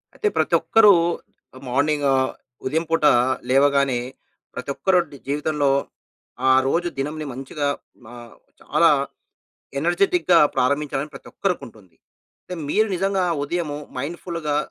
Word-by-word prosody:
అయితే 430 - -1
ప్రతొక్కరూ 215 -3 +5 0.7
మార్నింగ్ 145 +3 +1 0.6
ఉదయం 160 +5 0
పూటా 160 -3 +4 0.4
లేవగానే 140 -1 +3 0.6
ప్రతొక్కరొడ్ 155 +5 0
జీవితంలో 145 0 0 0.8
ఆ - - +7 0.2
రోజు 170 +5 +1
దినంని 150 +3 -3
మంచిగా 135 +3 -4 0.4
మా 120 +2 -12 0.5
చాలా - - +3 0.9
ఎనర్జిటిక్‌గా 175 +2 +3 0.2
ప్రారంభించాలని 140 +2 0
ప్రతొక్కరుకుంటుంది. 110 - -5 0.5
అయితే 180 - -7
మీరు 215 +8 +2
నిజంగా 195 0 0 0.2
ఉదయము 150 0 -3 0.2
మైండుఫులుగా 160 +2 -3
150 Hz, 90 wpm, -22 LUFS, 140-175 Hz, 0.9 s, ఆ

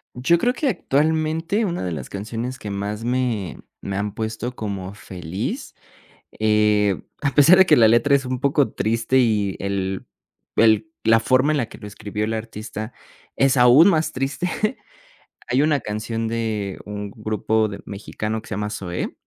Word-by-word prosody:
Yo 130 +8 +3
creo 245 +8 +1
que, 275 +3 -1
actualmente, 160 - 0
una 175 -4 -2
de 90 - -2
las 70 -5 -6
canciones 115 +5 -5
que 105 - -7
más 100 +2 -4
me 120 -7 -1 0.2
me 95 - -4
han 100 0 -2
puesto 110 +3 -4
como 100 -4 -5
feliz, 90 -3 -5 0.6
eh, 105 -2 +3 0.2
a 145 -1 +1
pesar 150 +5 +7
de 190 - +8
que - - +6
la 115 -2 +6
letra 120 +5 +4
es 135 -2 +1
un 130 0 -3
poco 140 0 +2
triste 115 +4 +1
y 105 -6 +2
el 95 -1 -2 0.5
el 115 +8 +4
la 115 0 +5
forma 130 +5 +3
en 150 - +1
la 120 - 0
que - - -13
lo 105 - -9
escribió 105 +1 -4
el 110 - -2
artista 110 0 -6 0.4
es 135 0 +3
aún 125 +8 +7
más 155 -4 +2
triste. 135 +7 -2 1.0
Hay 125 +3 +2
una 150 -3 +2
canción 110 +1 -3
de 110 -4 -2
un 105 -1 -6
grupo 110 0 0
de 100 -1 -7
mexicano, 105 +2 -4
que - - -16
se - - -5
llama 105 +1 -2
Zoé, 90 -4 -4
110 Hz, 170 wpm, -22 LUFS, 105-135 Hz, 1.0 s, de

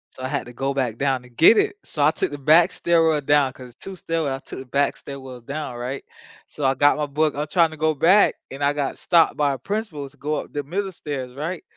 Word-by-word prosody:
So - - -11
I 130 - -2
had 140 +1 -2
to 120 - -11
go 135 +3 -2
back 125 -5 -2
down 135 -2 0
to 125 - -16
get 160 - +6
it, - - +2
so 145 -2 -1
I 155 - +5
took - - -2
the 145 - -6
back 155 +5 +5
stairwell 165 -3 +2
down, 145 -1 +3
'cause 130 -1 -12
it's 120 - -20
2 195 - -7
stairwells, 165 -6 -2
I - - -7
took - - -8
the 130 - -8
back 140 +3 0
stairwell 130 -3 -9
down, 140 +2 -5
right, 125 +3 -5 0.4
so 150 - -8
I 135 0 +3
got 145 +3 +4
my 150 -1 -1
book. 150 +1 0
I'm 150 +2 -3
trying 165 0 +3
to 155 - -10
go 155 0 +1
back, 180 +8 +4 0.2
and 135 +2 -5
I 140 +1 +3
got 145 -2 -3
stopped 170 -2 +3
by 145 -2 +2
a - - -5
principal 165 - -4
to - - -26
go 150 +1 -2
up - - -15
the 145 - -2
middle 190 +7 -3
stairs, 135 -7 -6
right, 165 +5 -4
145 Hz, 265 wpm, -22 LUFS, 135-160 Hz, 0.4 s, get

